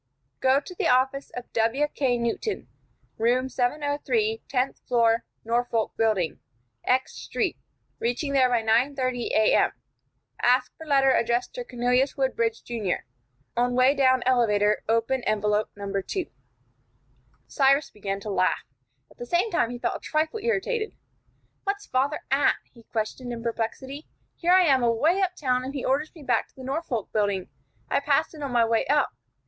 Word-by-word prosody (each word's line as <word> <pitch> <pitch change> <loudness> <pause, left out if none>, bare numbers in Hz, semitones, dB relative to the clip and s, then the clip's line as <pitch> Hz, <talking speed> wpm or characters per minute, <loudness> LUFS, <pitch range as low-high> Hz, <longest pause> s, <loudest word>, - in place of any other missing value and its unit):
"Go 265 +1 +4
to 360 +5 -5
office 265 +2 +2
of 245 0 -8
W.K. 250 +2 +1
Newton, 235 - -2 0.5
room 250 +3 +2
703, 295 - 0
tenth 260 0 0
floor, 230 -2 +3 0.2
Norfolk 235 -1 0
Building, 205 -8 +1 0.4
X 255 +1 +1
Street, - - -2 0.4
reaching 250 +5 -1
there 260 -2 +4
by 240 -2 +1
9:30 255 +2 +1
A.M. 215 0 +3 0.7
Ask 250 +1 +2
for 320 - -11
letter 275 -2 +4
addressed 240 - +1
to - - -5
Cornelius 250 - +1
Woodbridge, 235 -4 0
Jr. 220 -6 -2 0.5
On 245 +1 +1
way 255 +2 +5
down 260 -3 +3
elevator 210 -5 +3
open 230 +3 +1
envelope 210 0 +1
No. 200 -1 -6
2." 370 - -3 1.2
Cyrus 275 +1 +2
began 195 -1 -4
to 210 - -5
laugh. 185 -1 +1 0.5
At - - -21
the 240 - -6
same 360 - +1
time 240 -9 +2
he 245 - -5
felt - - -2
a - - -18
trifle 315 +7 -1
irritated. 460 0 -1 0.7
"What's 405 +1 -2
father 270 +4 0
at?" 275 +1 +4 0.2
he 235 - -16
questioned, 230 +3 -4
in 230 -1 -6
perplexity. 250 +5 -4 0.3
"Here 350 +1 +2
I 370 0 +7
am 270 -6 +4
away 265 +11 +2
up 365 -1 0
town, 255 -5 0
and 270 +2 -6
he 270 - -3
orders 290 +4 0
me 315 - -12
back - - +1
to - - -34
the 260 - -10
Norfolk 265 - -3
Building. 200 -3 0 0.4
I - - +1
passed - - +1
it 310 - -10
on 280 -2 -3
my 235 -1 +4
way 225 0 +1
up. 295 0 +2
255 Hz, 155 wpm, -26 LUFS, 230-285 Hz, 1.2 s, I